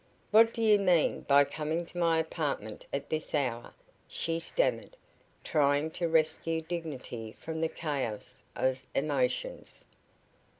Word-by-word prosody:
"What 225 Hz, +2 st, +7 dB
do 230 Hz, -, -2 dB
you 210 Hz, -2 st, +6 dB
mean 180 Hz, -5 st, +3 dB
by 140 Hz, 0 st, +7 dB
coming 155 Hz, +4 st, -3 dB
to 175 Hz, -, -11 dB
my 165 Hz, -1 st, +3 dB
apartment 150 Hz, -9 st, -3 dB
at 140 Hz, 0 st, -4 dB
this 155 Hz, 0 st, -2 dB
hour?" 125 Hz, -5 st, -2 dB, 0.3 s
she 165 Hz, 0 st, 0 dB
stammered, -, -, 0 dB, 0.5 s
trying 145 Hz, 0 st, +2 dB
to 170 Hz, +1 st, -1 dB
rescue 160 Hz, 0 st, +2 dB
dignity 135 Hz, -10 st, -5 dB
from 160 Hz, 0 st, -6 dB
the 165 Hz, -, +1 dB
chaos 140 Hz, -11 st, -4 dB
of 130 Hz, 0 st, 0 dB
emotions. 135 Hz, -3 st, -1 dB
155 Hz, 130 wpm, -30 LUFS, 140-165 Hz, 0.5 s, What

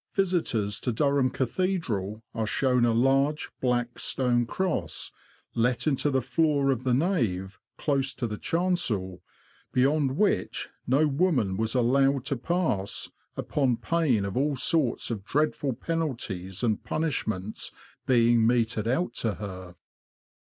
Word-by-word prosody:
visitors 155 Hz, -, 0 dB
to 125 Hz, -, -1 dB
Durham 140 Hz, +2 st, +2 dB
Cathedral 125 Hz, -, -2 dB
are 110 Hz, -2 st, -2 dB
shown 125 Hz, +2 st, +2 dB
a 120 Hz, -, +3 dB
large, 135 Hz, +5 st, +2 dB
black 120 Hz, -1 st, 0 dB
stone 120 Hz, -2 st, +1 dB
cross, 115 Hz, -, -2 dB, 0.4 s
let 125 Hz, +2 st, +1 dB
into 145 Hz, -1 st, +1 dB
the 130 Hz, -3 st, +1 dB
floor 145 Hz, -2 st, +2 dB
of 130 Hz, -2 st, -2 dB
the 130 Hz, -1 st, +1 dB
nave, 110 Hz, -, 0 dB, 0.2 s
close 140 Hz, -2 st, 0 dB
to 120 Hz, -, -2 dB
the 105 Hz, -2 st, -4 dB
chancel, 130 Hz, -, 0 dB, 0.5 s
beyond 135 Hz, +1 st, +2 dB
which 210 Hz, -, 0 dB, 0.2 s
no 135 Hz, +5 st, +4 dB
woman 140 Hz, -, +1 dB
was 110 Hz, +4 st, 0 dB
allowed 135 Hz, +2 st, +3 dB
to 140 Hz, -, -1 dB
pass, 130 Hz, -, -1 dB, 0.3 s
upon 130 Hz, -5 st, 0 dB
pain 145 Hz, -12 st, +1 dB
of 100 Hz, -, -4 dB
all 140 Hz, +3 st, +1 dB
sorts 150 Hz, -6 st, +1 dB
of 105 Hz, -4 st, -4 dB
dreadful 145 Hz, +2 st, 0 dB
penalties 115 Hz, -, -3 dB
and 110 Hz, -3 st, +1 dB
punishments 110 Hz, -, -2 dB, 0.4 s
being 115 Hz, -2 st, +4 dB
meted 115 Hz, -2 st, +1 dB
out 150 Hz, +10 st, 0 dB
to 110 Hz, -3 st, -1 dB
her. 95 Hz, -3 st, -8 dB
125 Hz, 130 wpm, -27 LUFS, 110-145 Hz, 0.5 s, no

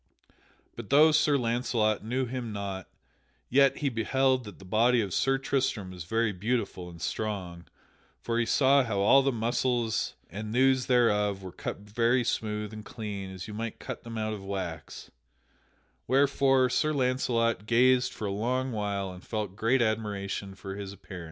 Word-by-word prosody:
But 115 Hz, -3 st, -8 dB
though 150 Hz, +3 st, +6 dB
Sir 150 Hz, -1 st, +3 dB
Launcelot 115 Hz, -3 st, 0 dB
knew 125 Hz, +4 st, -1 dB
him 120 Hz, -2 st, -4 dB
not, 100 Hz, -2 st, -5 dB, 0.6 s
yet 135 Hz, +1 st, +4 dB
he 145 Hz, -, 0 dB
beheld 130 Hz, +2 st, +1 dB
that 105 Hz, -, -10 dB
the 95 Hz, -, -14 dB
body 115 Hz, +5 st, +3 dB
of 100 Hz, -5 st, -2 dB
Sir 135 Hz, 0 st, +2 dB
Tristram 130 Hz, -8 st, -1 dB
was 90 Hz, -2 st, -8 dB
very 115 Hz, +2 st, +1 dB
beautiful 100 Hz, -2 st, -2 dB
and 85 Hz, -1 st, -12 dB
strong, 90 Hz, -4 st, -4 dB, 0.5 s
for 115 Hz, 0 st, -1 dB
he 120 Hz, -, +2 dB
saw 140 Hz, 0 st, +4 dB
how 110 Hz, -5 st, -2 dB
all 135 Hz, +7 st, +6 dB
the 135 Hz, 0 st, +1 dB
muscles 120 Hz, -1 st, 0 dB
and 105 Hz, +4 st, -6 dB
thews 130 Hz, 0 st, +3 dB
thereof 105 Hz, -6 st, +2 dB
were 95 Hz, -, -7 dB
cut -, -, -6 dB
very 115 Hz, +4 st, +1 dB
smooth 105 Hz, -2 st, -2 dB
and 110 Hz, 0 st, -8 dB
clean 100 Hz, -3 st, -6 dB
as 95 Hz, -2 st, -8 dB
you 105 Hz, -, -7 dB
might 115 Hz, +1 st, -4 dB
cut -, -, -6 dB
them 115 Hz, -1 st, -7 dB
out 110 Hz, 0 st, -2 dB
of 100 Hz, -2 st, -7 dB
wax, 95 Hz, -6 st, -6 dB, 1.0 s
wherefore 135 Hz, 0 st, +3 dB
Sir 155 Hz, +5 st, +1 dB
Launcelot 120 Hz, -5 st, 0 dB
gazed 125 Hz, +2 st, +4 dB
for 110 Hz, -, -6 dB
a 100 Hz, -, -1 dB
long 125 Hz, +6 st, -1 dB
while 100 Hz, -3 st, -2 dB
and 90 Hz, 0 st, -11 dB
felt 105 Hz, -4 st, -4 dB
great 120 Hz, +4 st, +2 dB
admiration 100 Hz, -3 st, -2 dB
for 95 Hz, 0 st, -7 dB
his 100 Hz, -1 st, -6 dB
appearance. 95 Hz, -1 st, -10 dB
110 Hz, 170 wpm, -28 LUFS, 100-125 Hz, 1.0 s, though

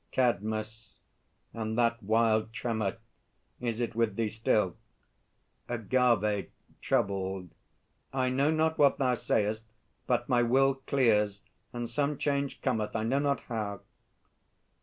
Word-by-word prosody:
CADMUS. 110 Hz, -2 st, -1 dB, 0.6 s
And 110 Hz, 0 st, -3 dB
that 115 Hz, -1 st, +2 dB
wild 110 Hz, +1 st, +2 dB
tremor, 110 Hz, -4 st, -2 dB, 0.6 s
is 120 Hz, -2 st, -2 dB
it 120 Hz, -1 st, -1 dB
with 115 Hz, -3 st, 0 dB
thee 115 Hz, -1 st, 0 dB
still? 105 Hz, -4 st, +1 dB, 0.9 s
AGAVE 115 Hz, -3 st, +1 dB, 0.3 s
(troubled). 95 Hz, -2 st, -1 dB, 0.6 s
I 130 Hz, -1 st, +1 dB
know 135 Hz, +3 st, +2 dB
not 160 Hz, 0 st, +1 dB
what 140 Hz, -2 st, +5 dB
thou 130 Hz, -2 st, +2 dB
sayest; 110 Hz, -2 st, 0 dB, 0.4 s
but 120 Hz, -1 st, +1 dB
my 125 Hz, -2 st, +3 dB
will 135 Hz, +3 st, +4 dB
Clears, 105 Hz, -6 st, +2 dB, 0.3 s
and 120 Hz, -1 st, -4 dB
some 140 Hz, +5 st, -1 dB
change 140 Hz, -1 st, -1 dB
cometh, 110 Hz, -5 st, -1 dB
I 110 Hz, -, 0 dB
know 130 Hz, +5 st, +1 dB
not 140 Hz, -1 st, 0 dB
how. 105 Hz, -4 st, -4 dB
115 Hz, 120 wpm, -30 LUFS, 110-130 Hz, 0.9 s, what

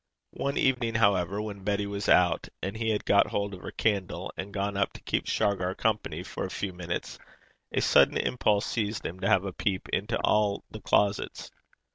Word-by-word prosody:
One 140 Hz, 0 st, -2 dB
evening, 120 Hz, -4 st, +1 dB
however, 100 Hz, -3 st, +2 dB
when 100 Hz, -2 st, -7 dB
Betty 100 Hz, 0 st, 0 dB
was 100 Hz, 0 st, -3 dB
out, 90 Hz, -3 st, +4 dB
and 95 Hz, +2 st, -3 dB
he 110 Hz, 0 st, -1 dB
had 105 Hz, -1 st, 0 dB
got 100 Hz, -, +5 dB
hold 100 Hz, 0 st, -2 dB
of 90 Hz, -, -9 dB
her -, -, -6 dB
candle, 100 Hz, -5 st, -1 dB
and 95 Hz, +2 st, -5 dB
gone 100 Hz, 0 st, -2 dB
up 100 Hz, 0 st, 0 dB
to -, -, -11 dB
keep -, -, -1 dB
Shargar 95 Hz, -2 st, 0 dB
company 110 Hz, -1 st, -1 dB
for -, -, -5 dB
a -, -, -3 dB
few 100 Hz, -2 st, -4 dB
minutes, 85 Hz, -1 st, -5 dB, 0.5 s
a -, -, +1 dB
sudden -, -, +5 dB
impulse 105 Hz, -4 st, +1 dB
seized 110 Hz, -2 st, -2 dB
him 90 Hz, +3 st, -5 dB
to 95 Hz, +2 st, 0 dB
have 100 Hz, -2 st, +4 dB
a 95 Hz, -, -4 dB
peep 95 Hz, -1 st, -2 dB
into 105 Hz, +3 st, -1 dB
all 105 Hz, -1 st, +2 dB
the -, -, -8 dB
closets. 100 Hz, 0 st, 0 dB
100 Hz, 195 wpm, -28 LUFS, 95-105 Hz, 0.5 s, got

